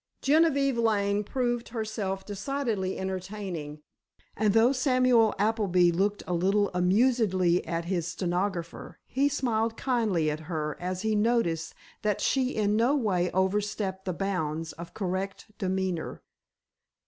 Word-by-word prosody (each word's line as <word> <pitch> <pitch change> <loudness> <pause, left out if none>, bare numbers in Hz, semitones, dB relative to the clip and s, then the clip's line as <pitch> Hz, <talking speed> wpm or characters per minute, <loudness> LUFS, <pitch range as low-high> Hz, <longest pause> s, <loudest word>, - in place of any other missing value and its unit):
Genevieve 280 -4 +3
Lane 205 -2 +1
proved 240 +1 -2
herself 215 -4 -3
decidedly 205 -2 -2
entertaining, 185 -5 -5 0.5
and 210 0 +1
though 230 +3 +6
Samuel 255 -4 +3
Appleby 195 -4 +3
looked 200 +4 0
a 180 - -2
little 195 +4 +2
amusedly 185 -2 +2
at 165 +1 -2
his 175 -2 -1
stenographer, 175 -1 -3
he 275 +2 +1
smiled 230 -5 0
kindly 215 - +1
at 150 - -4
her 150 -3 -2
as 185 +2 -3
he 220 0 +1
noticed 210 -7 +1 0.3
that 210 -2 0
she 260 -2 +1
in 210 -1 +1
no 240 +6 +3
way 185 -9 +1
overstepped 190 0 -1
the 185 - -1
bounds 165 -4 -2
of 170 +1 -10
correct 195 +2 -4
demeanor. 190 -3 -2
200 Hz, 125 wpm, -28 LUFS, 180-230 Hz, 0.5 s, though